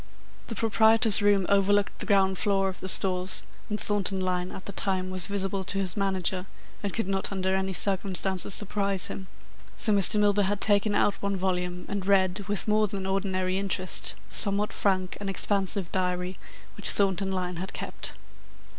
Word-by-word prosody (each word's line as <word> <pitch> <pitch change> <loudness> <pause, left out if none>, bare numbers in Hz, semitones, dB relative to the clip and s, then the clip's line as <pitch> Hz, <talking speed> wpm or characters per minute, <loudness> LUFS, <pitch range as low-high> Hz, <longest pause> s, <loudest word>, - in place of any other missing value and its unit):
The 230 - -5
proprietor's 220 -1 +4
room 205 -2 +3
overlooked 200 0 +1
the - - -2
ground 190 -2 +2
floor 195 -2 +1
of 185 - -9
the 190 - -4
Stores, 185 0 +3 0.3
and 210 0 -3
Thornton 200 -2 0
Lyne 180 -1 -2
at 190 - -10
the - - -5
time 185 -1 -2
was 185 -2 +2
visible 195 -1 -2
to 195 - -4
his 190 -2 -2
manager, 190 -2 -1 0.3
and 200 - -3
could 225 -2 -3
not 195 0 -1
under 190 -1 -1
any 190 0 -1
circumstances 190 0 +2
surprise 200 -2 +1
him, 190 - -7 0.5
so 215 - +1
Mr. 200 +1 +4
Milburgh 205 -1 +2
had 205 +1 -1
taken 205 0 +2
out 205 - +1
one 200 -1 -2
volume 180 -1 -3
and 200 -2 -4
read, 190 0 +1
with 205 +1 -1
more 215 0 +2
than 195 -1 -5
ordinary 190 -1 -1
interest, 185 -2 0
the - - -14
somewhat 205 0 +3
frank 185 -2 -1
and 200 -1 -4
expansive 195 -1 0
diary 180 0 -2 0.4
which 205 - +2
Thornton 195 -1 +1
Lyne 180 -2 -3
had 190 +3 -5
kept. - - -5
195 Hz, 175 wpm, -26 LUFS, 185-205 Hz, 0.5 s, proprietor's